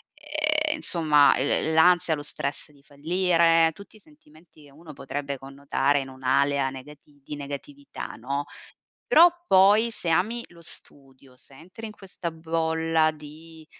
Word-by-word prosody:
Ehm, 305 +1 -1 0.2
insomma 150 -4 +4
l 150 +3 0
l'ansia, 175 0 +4
lo 145 - -8
stress 145 0 -6
di 140 -1 -23
fallire, 165 +2 +2
tutti 200 +4 -15
i - - -20
sentimenti 165 - -22
che 145 - -18
uno 155 +1 -13
potrebbe 140 0 -5
connotare 140 +1 -1
in 135 -1 -6
un'area 135 +1 0
negati 145 +2 -14
di 150 - -7
negatività, 145 - -8
no; 140 +5 -4 0.6
però 350 -7 +7 0.2
poi 205 +4 +5
se 175 - -3
ami 220 +8 0
lo 170 -1 -17
studio, 135 -3 -6
se 135 - -14
entri 185 +9 -11
in 215 - -7
questa 185 -4 -7
bolla 160 0 0
di, 155 +1 -14
155 Hz, 145 wpm, -25 LUFS, 140-180 Hz, 0.6 s, però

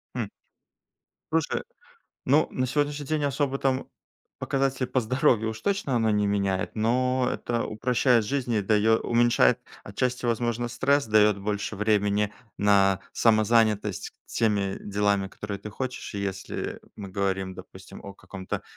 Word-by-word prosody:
М. - - -3 1.0
Слушай, 160 -2 0 0.6
ну, 145 +4 +3
на 130 0 -1
сегодняшний 145 +1 -1
день 155 -1 -1
особо 140 -1 0
там 135 -1 0 0.5
показатель 135 -1 0
по 125 +1 0
здоровью 115 -2 +2
уж 110 0 -8
точно 195 -10 -1
оно 110 -1 +2
не 105 -1 +2
меняет, 100 -2 -1
но 125 +3 +1
это 120 -1 -2
упрощает 120 +1 +2
жизнь 125 0 -2
и 105 - +1
даё 110 +2 +3
уменьшает 120 0 +3 0.3
отчасти, 125 +5 -2
возможно, 120 0 0
стресс, 140 +2 +1
дает 105 -1 +4
больше 100 +1 -3
времени 105 0 +1 0.2
на 100 -2 +3
самозанятость 110 -1 +2
теми 100 -4 0
делами, 100 -1 0
которые 100 +1 -6
ты 105 - -8
хочешь. 130 +3 -5
Если, 100 -2 -4 0.2
э, - - -15 0.2
мы 100 -2 -8
говорим, 95 -1 -1
допустим, - - -12
о 100 - -9
каком-то 95 0 -6
110 Hz, 140 wpm, -26 LUFS, 100-130 Hz, 1.0 s, дает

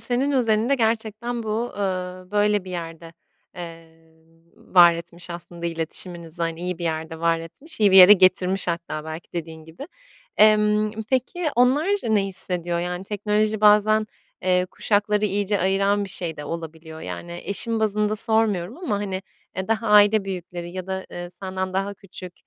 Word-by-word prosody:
senin 260 +4 +1
özelinde 235 0 +2
gerçekten 225 0 -1
bu, 225 +2 -3
eee, - - -5 0.5
böyle 205 -1 +2
bir 185 - -9
yerde, 165 -1 -7 0.4
eee, 165 -1 -11 0.4
var 175 -2 +5
etmiş 170 +1 -9
aslında 170 0 -7
iletişiminizi, 170 0 -3
hani, 165 0 -3
iyi 180 -1 -3
bir 170 - -5
yerde 160 0 -4
var 165 0 +2
etmiş, 225 - -7
iyi 205 -2 +5
bir 190 - +5
yere 185 +2 +11
getirmiş 185 -1 +3
hatta 170 -2 -4
belki 160 +1 -8
dediğin 160 -2 -6
gibi. 160 - -10 0.5
Emm, 210 0 +4 0.2
peki, 305 +7 0
onlar 260 +6 +3 0.2
ne 210 -3 +2
hissediyor? 175 -2 0
Yani, 180 +1 -4
teknoloji 210 +1 0
bazen, 215 +1 +4 0.4
eee, 180 0 +2
kuşakları 210 +2 0
iyice 205 0 0
ayıran 195 +2 +1
bir - - -8
şey 170 -3 -3
de 145 - -7
olabiliyor. 160 -1 -7
Yani, 170 +1 -7
eşin 225 +3 -1
bazında 210 0 0
sormuyorum 220 -3 +1
ama, 280 - -2
hani, 195 -2 -4 0.3
eee, 190 +2 -4
daha 225 0 0
aile 210 0 +5
büyükleri 175 -2 -6
ya 185 0 -6
da, 190 0 -4
eee, 175 0 -7
senden 190 0 -5
daha 195 +2 -2
küçük, 185 -2 -11
190 Hz, 160 wpm, -23 LUFS, 170-215 Hz, 0.5 s, yere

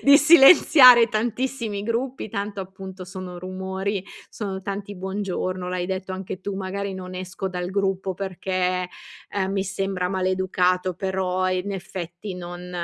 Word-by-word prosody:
Di 280 0 +7
silenziare 270 -5 +8
tantissimi 225 -1 -2
gruppi, 235 +2 -2
tanto 200 0 -4
appunto, 190 0 -8
sono 180 0 -8
rumori. 190 +1 -3 0.2
Sono 195 -3 -5
tanti 200 +1 -5
"Buongiorno" 185 -1 -3
l’hai 180 -1 -2
detto 190 0 -4
anche 185 -1 -6
tu: 200 +1 -4
"Magari 195 0 -4
non 185 0 -7
esco 185 +1 -4
dal 180 -1 -4
gruppo 195 -1 -1
perché, 185 -1 -2 0.5
uhm, 190 -1 0
mi 195 -1 -1
sembra 195 -1 -2
maleducato, 185 -1 +1
però 185 -1 -1
in 185 +2 -2
effetti 180 0 -6
non 175 0 -8
190 Hz, 135 wpm, -24 LUFS, 185-200 Hz, 0.5 s, silenziare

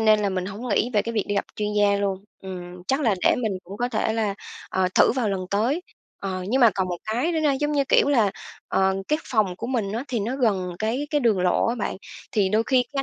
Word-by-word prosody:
nên 215 -1 +5
là 205 - +1
mình 185 -1 -2
hổng 210 +5 -6
nghĩ 235 +2 +1
về 205 - +4
cái 230 - -4
việc 215 -3 0
đi 205 - -1
gặp 200 - 0
chuyên 210 0 -1
gia 205 -1 +3
luôn. 195 -1 -2 0.2
Ừm, 180 -1 -8
chắc 270 +2 +2
là 230 -8 +3
để - - +5
mình 220 -3 0
cũng 195 +3 -9
có 245 +3 -1
thể 220 -2 0
là, 215 -3 0 0.4
ờ, 185 -1 +1
thử - - +5
vào 245 -4 0
lần 195 -2 -1
tới. 240 - +1 0.4
Ờ, 185 -2 -3
nhưng 260 +3 +2
mà 235 -3 +7
còn 190 -1 0
một 175 - -2
cái 240 +10 0
nữa 320 - 0
na, 300 -2 +3
giống 295 +2 -1
như 280 -1 +2
kiểu - - +4
là, 230 -8 +3 0.4
ờ, 190 0 +2
cái 305 - +2
phòng 210 -7 0
của - - -5
mình 230 -6 -1
á 235 +4 -3
thì 235 -4 -1
nó 240 +6 -2
gần 195 -8 +1
cái 230 +7 -1
cái 295 -1 +2
đường 220 -6 +2
lộ 180 -1 +2
á 235 - +1
bạn, 220 - -3 0.4
thì 200 -3 +2
đôi 215 +3 +2
khi 255 -2 +3
cái 275 -1 0
215 Hz, 265 wpm, -24 LUFS, 195-250 Hz, 0.4 s, mà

